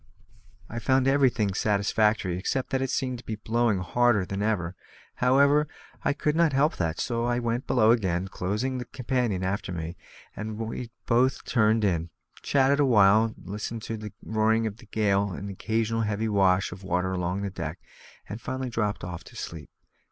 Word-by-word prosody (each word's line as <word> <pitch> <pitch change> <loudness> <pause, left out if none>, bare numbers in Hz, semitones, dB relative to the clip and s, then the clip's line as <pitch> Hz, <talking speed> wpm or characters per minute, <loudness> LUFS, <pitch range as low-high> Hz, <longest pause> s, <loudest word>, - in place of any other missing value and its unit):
I 115 - -5
found 130 +2 +2
everything 125 -7 +3
satisfactory, 105 -1 +1
except 125 +8 -2
that 135 -1 +1
it 135 - -1
seemed 130 -2 -1
to - - -12
be 110 - -4
blowing 110 0 +1
harder 120 +1 +2
than 100 +2 -4
ever; 95 -5 -1 0.4
however, 140 +4 +4 0.4
I - - +2
could 150 +1 0
not 165 -3 +3
help 145 +4 +2
that, 80 -1 -1
so 115 -1 -1
I 120 0 +1
went 120 +1 -2
below 110 -3 +4
again, 95 -6 +1
closing 105 +9 -2
the 125 - -5
companion 120 -7 -1
after 95 0 -2
me, 85 0 -5 0.4
and 110 0 -5
we 115 +2 -4 0.2
both 125 +3 +2
turned 110 -2 +2
in, 85 -4 0 0.3
chatted 140 +1 +3
awhile, 110 -4 +5
listened 105 +4 -6
to 115 - -4
the 105 -1 -7
roaring 110 +1 +2
of 105 -1 -4
the 120 - -16
gale 100 -2 +1
and 100 - -6
the 100 - -5
occasional 115 +3 -1
heavy 105 0 -1
wash 95 -2 +3
of 95 +2 -9
water 90 0 0
along 90 +1 -2
the 100 - -3
deck, - - -5 0.5
and 105 +4 -7
finally 130 -1 -4
dropped 105 -3 -1
off 90 -2 -6
to - - -14
sleep. 80 -2 -7
110 Hz, 180 wpm, -27 LUFS, 100-120 Hz, 0.5 s, awhile